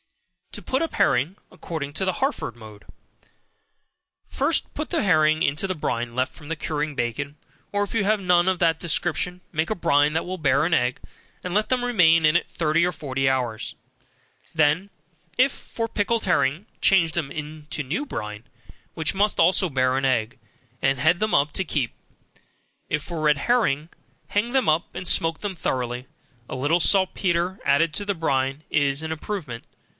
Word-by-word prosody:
To - - -8
Put 265 - -1
up 330 - -2
Herring, 140 +10 +2
According 160 -6 -6
to 190 - -2
the 185 - +1
Harford 270 - -2
Mode. 110 -2 -13 1.4
First - - 0
put - - -4
the - - 0
herring 155 0 +3
into 145 +6 0
the 185 - -2
brine 120 -5 -2
left 130 +2 -1
from 150 -1 -13
curing 150 -1 -3
bacon, 140 +5 -3 0.3
or, 205 0 +1
if 205 - -5
you 225 -3 +1
have 215 +1 +2
none 180 -2 +3
of 185 - +1
that 165 -2 +2
description, 175 +1 -1
make 160 +1 0
a 215 - 0
brine 145 -4 +3
that 160 +1 -1
will 185 +1 -5
bear 140 -1 +3
an 170 - 0
egg, 125 -2 +1 0.4
and 180 - -4
let 210 +2 +1
them 250 -1 +1
remain 165 -9 +4
in 155 +2 +4
it 175 - +1
thirty 165 0 +1
or 180 - +2
forty 135 -4 -1
hours; 120 -4 -2 0.8
then, 160 +5 +2 0.5
if 260 +2 +4
for 230 -1 -5
pickled 225 +1 0
herring, 170 0 +1 0.2
change 175 -4 +4
them 155 -6 -2
into 150 0 -5
new 155 - -2
brine, 105 - -6 0.5
which 160 -2 0
must 205 +2 +1
also 185 0 +4
bear 130 -2 +1
an 135 - -1
egg, 120 -4 0 0.4
and 135 0 +2
head 155 +7 +3
them 215 0 0
up 145 +1 +3
to 190 - +1
keep. 145 -8 -2 1.0
If 155 -1 -1
for 170 -3 -5
red 150 -1 +3
herring, 155 - +1 0.4
hang 210 +4 0
them 265 0 +2
up, 155 +3 +2
and 185 - -5
smoke 165 -1 +2
them 205 -2 -4
thoroughly. 125 -5 -3 0.4
A - - -4
little 145 +7 +1
saltpetre, 185 -1 +2
added 150 +3 +3
to 205 - -1
the 200 -1 -1
brine, 135 -2 -1
is 145 -1 +1
an 160 - -4
improvement. 155 - -5
160 Hz, 180 wpm, -24 LUFS, 140-185 Hz, 1.4 s, remain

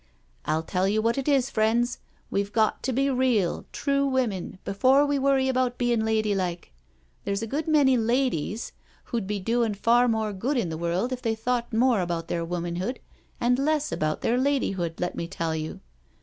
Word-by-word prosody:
I'll 155 +1 0
tell 185 +3 0
you 210 +2 +1
what 230 +4 +1
it 270 - -4
is, 270 -3 +2
friends, 235 +3 +1 0.3
we've 200 0 -1
got 215 0 +1
to 260 - -1
be 275 +2 +1
real, 250 -8 +1
true 280 -1 0
women 245 -10 -1
before 260 +8 +4
we 285 -1 0
worry 270 -1 +2
about 255 -1 0
bein' 240 -2 +1
ladylike. 205 - -1 0.5
There's 200 +2 -2
a - - -1
good 290 +8 -3
many 290 -4 +4
ladies 235 - 0 0.3
who'd 230 -5 -3
be 205 0 -2
doin' 225 +2 0
far 240 +4 +3
more 220 -2 0
good 255 +9 -1
in 195 -8 0
the 160 - -4
world 170 +9 -1
if 250 - -5
they 225 -2 0
thought 240 +1 -2
more 235 -2 +3
about 170 -2 -3
their 170 - -1
womanhood 175 +7 -3 0.4
and 245 +1 +2
less 305 +1 +1
about 155 0 -1
their 240 +2 +1
ladyhood, 195 - 0
let 180 0 -1
me 170 - -4
tell 165 -1 -2
you. 155 0 -5
230 Hz, 185 wpm, -26 LUFS, 190-260 Hz, 0.5 s, before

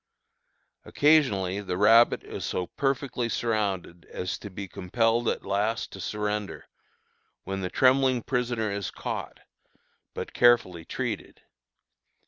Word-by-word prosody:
Occasionally 105 -11 +2
the 90 -3 -3
rabbit 115 +4 +5
is - - -7
so 90 - -2
perfectly 135 0 -2
surrounded 100 -7 -2
as 90 - -5
to 100 - -8
be 100 +1 -7
compelled 115 +6 0
at - - -3
last 105 +4 -1
to - - -9
surrender, 105 -1 -3 0.8
when 95 0 -4
the 90 - -2
trembling 130 -1 +3
prisoner 120 -4 -1
is 100 -2 -3
caught, - - -6 0.7
but - - -6
carefully 105 -9 +3
treated. - - -5
105 Hz, 115 wpm, -27 LUFS, 95-120 Hz, 0.8 s, rabbit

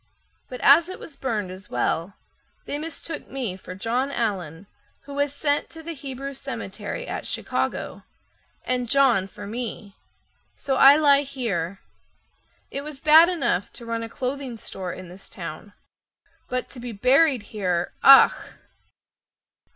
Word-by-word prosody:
But 250 - -7
as 325 +5 +6
it 375 - -6
was 305 - -10
burned 220 -9 -3
as 185 +1 -10
well, 165 +10 -1 0.5
they 290 - -3
mistook 320 0 -5
me 250 -9 -3
For 185 -1 -10
John 245 +7 -1
Allen 195 - -3 0.4
who 280 - -11
was 285 0 0
sent 285 0 0
to 325 0 -11
the 335 +1 -5
Hebrew 275 -1 -6
Cemetery - - -6
At - - -5
Chicago, - - -2 0.6
And 250 -2 -1
John 255 -9 +4
for 205 +1 -10
me, 220 -2 -6 0.6
so 270 - -2
I 275 +2 +9
lie 285 -2 +5
here. 200 - -3 0.9
It 275 - -3
was 300 -2 -7
bad 315 +4 +7
enough 245 - -1
to 235 - -11
run 230 0 -3
a 230 - -6
clothing 255 0 -4
store 190 -3 -5
in 185 +1 -9
this 180 +3 -13
town, 170 +4 -8 0.8
But 255 0 -2
to 255 - -10
be 240 -1 -6
buried 255 +3 +3
here—_ach! 190 +7 +5
250 Hz, 145 wpm, -24 LUFS, 200-280 Hz, 0.9 s, I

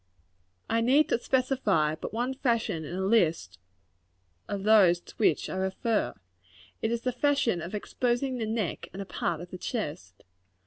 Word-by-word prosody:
] 90 +1 -43
I - - +2
need 270 +6 +4
to - - +2
specify 250 - +1
but 155 - -6
one 245 +4 -1
fashion 230 - 0
in 155 +4 -6
the 190 +1 -1
list 165 - +1 0.9
of 200 -1 -4
those 200 -5 +6
to - - -16
which 220 - +2
I - - -5
refer. 190 - -1 0.7
It 225 - 0
is 235 -1 -1
the 255 - 0
fashion 250 -7 +1
of 170 +5 -5
exposing 245 +4 -1
the 220 - -2
neck 220 -4 -2
and 195 - -6
a - - -13
part 170 -3 -2
of 175 - -10
the 185 - -7
chest. 145 - -5
210 Hz, 175 wpm, -28 LUFS, 170-240 Hz, 0.9 s, those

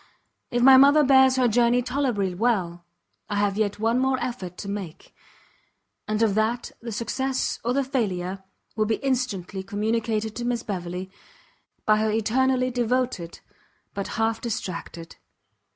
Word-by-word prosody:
If 240 0 0
my 265 0 +9
mother 285 +3 +6
bears 265 -1 +5
her 255 -1 +3
journey 240 +2 +3
tolerably 245 -8 -1
well, 180 -5 -1 0.4
I 205 - -2
have 205 -1 +1
yet 210 -1 0
one 225 +3 +1
more 265 0 +1
effort 185 -8 -5
to 200 - -7
make; 200 -5 -7 0.9
and 215 +1 0
of 215 -3 +2
that 220 +3 -1
the 230 0 -6
success 260 +4 -2
or 240 +2 0
the 275 +1 +1
failure 195 -8 -2 0.3
will 215 -1 +1
be 220 - +1
instantly 240 -9 -2
communicated 220 +2 -2
to 240 - -4
Miss 240 -1 -1
Beverley, 180 -1 -5 0.7
by 215 0 +4
her 215 0 +1
eternally 255 +4 +1
devoted, 245 -7 -1 0.5
but 200 - -4
half 225 0 0
distracted. 170 -6 -6
225 Hz, 145 wpm, -25 LUFS, 200-250 Hz, 0.9 s, my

